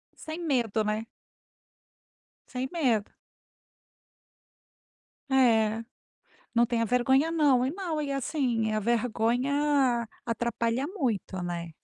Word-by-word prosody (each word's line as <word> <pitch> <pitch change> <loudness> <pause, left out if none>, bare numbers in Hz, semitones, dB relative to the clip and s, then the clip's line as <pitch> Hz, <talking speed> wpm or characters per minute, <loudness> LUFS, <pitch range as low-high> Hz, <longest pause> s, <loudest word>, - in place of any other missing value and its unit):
Sem 320 +2 -7
medo, 235 -7 +1
né? 215 +1 -1 1.4
Sem 255 0 -3
medo. 245 - +1 2.2
É. 225 -4 +3 0.7
Não 235 +1 +5
tenha 230 -1 0
vergonha 265 +7 +3
não. 280 -6 +3
E 270 - -1
não 340 -4 -3
e, 280 -1 -3
assim, 250 -5 0
a 215 - +1
vergonha 245 +3 +1 0.2
atrapalha 235 +3 -1
muito, 235 - -2
né? 170 -1 -4
245 Hz, 95 wpm, -28 LUFS, 225-280 Hz, 2.2 s, Não